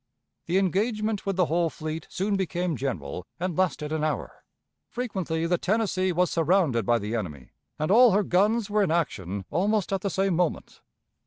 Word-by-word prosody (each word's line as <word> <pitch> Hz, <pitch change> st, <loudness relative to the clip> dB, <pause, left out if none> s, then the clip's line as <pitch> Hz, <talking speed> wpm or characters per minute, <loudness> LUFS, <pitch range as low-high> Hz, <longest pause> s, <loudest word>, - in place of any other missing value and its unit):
The 175 Hz, +3 st, +2 dB
engagement 210 Hz, +3 st, 0 dB
with 195 Hz, -, 0 dB
the 180 Hz, -1 st, +3 dB
whole 165 Hz, +1 st, +1 dB
fleet 155 Hz, +1 st, -6 dB
soon 200 Hz, +2 st, -1 dB
became 180 Hz, -3 st, -1 dB
general, 90 Hz, -, -4 dB
and 180 Hz, -1 st, -2 dB
lasted 165 Hz, -4 st, 0 dB
an 155 Hz, -1 st, -1 dB
hour. 155 Hz, -1 st, -3 dB, 0.5 s
Frequently 185 Hz, -9 st, -2 dB
the 175 Hz, 0 st, +1 dB
Tennessee 190 Hz, -3 st, +1 dB
was 180 Hz, +1 st, +1 dB
surrounded 165 Hz, -, +2 dB
by 120 Hz, 0 st, +4 dB
the 105 Hz, +1 st, -3 dB
enemy, 75 Hz, -, -5 dB, 0.3 s
and 155 Hz, +4 st, -1 dB
all 245 Hz, +3 st, +8 dB
her 205 Hz, +2 st, +3 dB
guns 205 Hz, +5 st, +2 dB
were 210 Hz, 0 st, +1 dB
in 195 Hz, -, +2 dB
action 100 Hz, -, -2 dB
almost 200 Hz, +4 st, +1 dB
at 195 Hz, -, 0 dB
the 200 Hz, -, -1 dB
same 190 Hz, 0 st, +1 dB
moment. 175 Hz, -1 st, -2 dB
180 Hz, 175 wpm, -26 LUFS, 155-195 Hz, 0.5 s, all